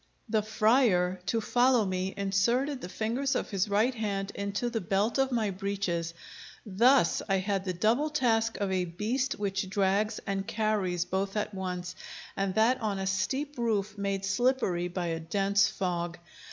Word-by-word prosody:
The 220 -1 +1
friar, 215 -4 +2
to 230 - +1
follow 245 0 +3
me, 185 0 -2
inserted 235 +8 +1
the 175 - -6
fingers 235 +8 -1
of - - -2
his 195 +1 0
right 215 +6 +2
hand 200 -4 -2
into 200 +4 -2
the 230 -2 -2
belt 200 +7 0
of 270 0 +2
my 220 -4 0
breeches. 185 -4 -2 0.5
Thus 230 0 +4
I 195 - +3
had 195 0 -1
the 185 - -1
double 230 - +2
task 230 -6 +1
of 200 -2 -1
a 185 -1 +1
beast 225 +10 -1
which 195 -1 -2
drags 200 +2 +1
and 195 -1 -2
carries 210 -6 0
both 195 +2 -2
at 210 0 -2
once, 180 -1 -4 0.4
and 195 -1 -1
that 240 +4 +3
on 210 -3 -1
a 190 - -3
steep 260 +9 -2
roof, 210 -3 0
made 195 -1 -2
slippery 200 -5 +1
by 180 0 -3
a 165 -1 -2
dense 200 +4 +2
fog. 175 -3 -3
200 Hz, 165 wpm, -29 LUFS, 190-225 Hz, 0.5 s, Thus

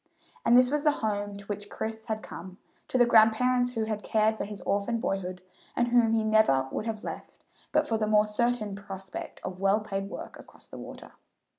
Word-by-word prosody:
And 245 - +6
this 250 +1 +5
was 295 0 0
the 300 -1 +4
home 205 -1 -2
to 200 0 -10
which 205 0 -5
Chris 220 0 -5
had 215 -1 -3
come 185 +1 -9 0.3
to - - 0
the 245 - +6
grandparents 245 +2 +4
who 225 -2 -1
had 215 -1 -3
cared 220 0 +2
for - - -4
his 205 -1 -8
orphaned 205 +4 0
boyhood, 185 -3 -3 0.3
and 240 0 +1
whom 235 -2 +4
he 225 -1 +2
never 215 -12 +3
would 220 - -3
have 220 -1 -4
left - - -8 0.3
but 305 0 +2
for 225 -1 0
the 215 - 0
more 210 0 +4
certain 215 -1 0
prospect 195 -2 -8
of 185 0 -6
well 195 +2 +3
paid 195 -2 -4
work - - -8
across - - -16
the - - -10
water. - - -10
215 Hz, 205 wpm, -28 LUFS, 200-230 Hz, 0.3 s, And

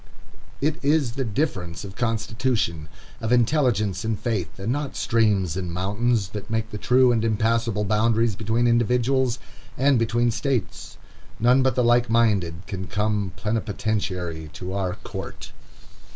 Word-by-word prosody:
It 150 +1 -1
is 145 -3 +2
the 135 +3 -2
difference 100 - -2
of 95 -1 -9
constitution, 115 -8 -1 0.3
of 110 0 -3
intelligence, 120 - +2
and 110 -2 -1
faith, 105 -10 -2
and 100 +4 -2
not 145 +1 -3
streams 105 -7 +1
and 90 -2 -3
mountains, 100 +3 0
that 105 +1 -7
make 110 0 -2
the 105 - -5
true 125 +2 +4
and 115 -2 +1
impassable 115 -1 +1
boundaries 110 +1 +2
between 110 +3 0
individuals 125 +2 +2 0.4
and 135 -1 +3
between 120 +1 +1
states. 130 -2 -3 0.4
None 125 +3 +4
but 130 -1 +2
the 125 - +2
like 120 +1 +3
minded 100 -7 +1
can 95 -1 -5
come 105 -3 -1
plenipotentiary 100 -6 -2
to 90 +5 -6
our 95 -2 -1
court. - - -7
110 Hz, 140 wpm, -24 LUFS, 100-120 Hz, 0.4 s, true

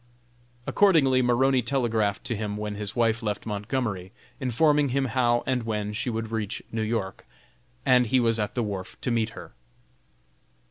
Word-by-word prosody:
Accordingly 150 -10 +4
Maroney 125 +2 +3
telegraphed 115 -5 0
to 125 -3 -2
him 105 -1 -3
when 105 0 -3
his 105 0 -5
wife 115 -1 +2
left 105 -2 -3
Montgomery, 105 -3 -3 0.3
informing 145 +3 +2
him 135 +2 +1
how 120 -1 +1
and 130 -2 0
when 105 -2 -3
she 120 +4 -2
would 110 -1 -3
reach 110 -2 -3
New 115 - -2
York, 110 -3 -3 0.6
and 125 -2 +5
he 130 +3 +3
was 115 -2 +2
at 105 -1 -2
the 120 - 0
wharf 100 -3 -5
to 125 - -1
meet 115 -1 +1
her. 85 -2 -10
115 Hz, 165 wpm, -26 LUFS, 105-130 Hz, 0.6 s, and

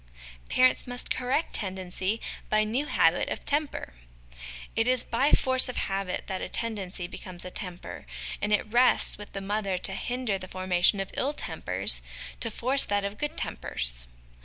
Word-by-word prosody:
Parents 255 0 +4
must 245 0 -5
correct 260 +5 0
Tendency 190 +1 -2 0.3
by 215 0 +4
New 245 +7 -1
Habit - - +3
of - - -4
Temper. 290 - 0 0.8
It 225 +1 +2
is 255 -1 +3
by 265 +5 +2
force 260 -1 +3
of 250 - -4
habit 195 -1 -1
that 190 -1 -3
a - - -4
tendency 200 -5 -3
becomes 175 0 -7
a 180 - -6
temper; 175 - -5 0.3
and 210 - 0
it 210 - +3
rests 240 0 +3
with 205 - -9
the 195 - -4
mother 200 -1 -1
to 190 - +2
hinder 240 -1 -1
the 185 - -7
formation 185 +1 +3
of 195 - -3
ill 280 +3 0
tempers, - - -1 0.4
to 230 - +1
force 260 +5 +5
that 205 0 +1
of 200 +1 -5
good 295 +2 -2
tempers. - - -2
210 Hz, 165 wpm, -28 LUFS, 185-250 Hz, 0.8 s, force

